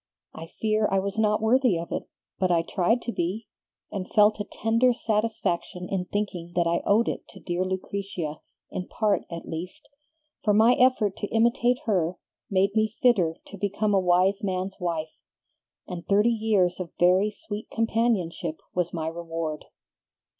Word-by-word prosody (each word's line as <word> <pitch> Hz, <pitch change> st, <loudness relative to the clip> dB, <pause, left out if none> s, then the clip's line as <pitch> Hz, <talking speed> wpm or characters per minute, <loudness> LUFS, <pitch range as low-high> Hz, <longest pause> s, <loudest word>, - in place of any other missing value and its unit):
I 165 Hz, -, -8 dB
fear 215 Hz, +3 st, 0 dB
I 195 Hz, -, +3 dB
was 200 Hz, +2 st, -2 dB
not 215 Hz, 0 st, +2 dB
worthy 245 Hz, -4 st, +4 dB
of 165 Hz, +1 st, -6 dB
it, -, -, -4 dB, 0.3 s
but 185 Hz, -1 st, +2 dB
I 170 Hz, -2 st, +3 dB
tried 195 Hz, +8 st, +1 dB
to 235 Hz, -, -3 dB
be, 195 Hz, +4 st, -2 dB, 0.5 s
and 190 Hz, -3 st, -4 dB
felt 210 Hz, 0 st, +5 dB
a 205 Hz, -, -2 dB
tender 230 Hz, +5 st, +2 dB
satisfaction 215 Hz, -6 st, -1 dB
in 185 Hz, -2 st, -1 dB
thinking 180 Hz, -4 st, -3 dB
that 175 Hz, -1 st, +3 dB
I 170 Hz, +1 st, +1 dB
owed 220 Hz, +3 st, +4 dB
it -, -, -3 dB
to -, -, -13 dB
dear 175 Hz, +1 st, -2 dB
Lucretia, 185 Hz, -4 st, -4 dB, 0.3 s
in 180 Hz, -, -4 dB
part 215 Hz, -2 st, 0 dB
at 170 Hz, -1 st, -7 dB
least; 170 Hz, +3 st, -6 dB, 0.6 s
for 210 Hz, -1 st, +3 dB
my 225 Hz, +3 st, +6 dB
effort 245 Hz, -6 st, +3 dB
to 205 Hz, -, -3 dB
imitate 235 Hz, +3 st, +2 dB
her 180 Hz, -5 st, +1 dB, 0.3 s
made 195 Hz, 0 st, +2 dB
me 220 Hz, 0 st, +1 dB
fitter 185 Hz, -10 st, +4 dB
to 200 Hz, -, -10 dB
become 205 Hz, +1 st, 0 dB
a 195 Hz, -, +5 dB
wise 185 Hz, +2 st, +2 dB
man's 190 Hz, 0 st, -2 dB
wife, 165 Hz, -3 st, -3 dB, 0.7 s
and 175 Hz, -1 st, -6 dB
thirty 210 Hz, +4 st, +4 dB
years 210 Hz, -6 st, +1 dB
of 180 Hz, -3 st, -5 dB
very 185 Hz, +4 st, +4 dB
sweet 210 Hz, 0 st, -7 dB
companionship 220 Hz, -8 st, 0 dB
was 180 Hz, -1 st, 0 dB
my 160 Hz, -1 st, -2 dB
reward." 165 Hz, -2 st, -4 dB
195 Hz, 165 wpm, -26 LUFS, 175-220 Hz, 0.7 s, my